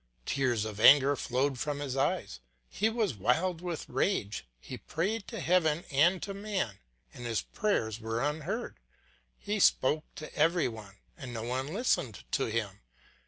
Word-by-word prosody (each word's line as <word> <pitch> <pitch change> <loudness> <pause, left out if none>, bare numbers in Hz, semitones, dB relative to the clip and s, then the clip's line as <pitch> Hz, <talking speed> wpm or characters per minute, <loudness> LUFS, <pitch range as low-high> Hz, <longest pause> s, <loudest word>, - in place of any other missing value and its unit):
Tears 125 -6 +1
of 110 -1 -6
anger 140 +4 +7
flowed 130 +1 -1
from 145 +1 -2
his 140 -3 -3
eyes, 95 - -1 0.3
he 210 - 0
was 225 - 0
wild 160 - +1
with 175 -3 -4
rage; 105 - -1
he - - -8
prayed 195 +6 -2
to 230 - -6
heaven 165 0 +2
and 170 +7 +3
to 200 - -4
man, 195 - -3 0.3
and 120 -1 -7
his 115 -2 -1
prayers 115 - -1
were 115 0 -2
unheard; 155 - -3 0.6
he 210 0 -2
spoke 155 -3 +3
to 155 - -8
every 165 +3 +3
one 110 -4 -9 0.2
and 130 -6 -8
no 110 - -4
one 130 +3 -2
listened 150 - -1
to - - +1
him. 110 -3 -3
145 Hz, 160 wpm, -30 LUFS, 115-180 Hz, 0.6 s, anger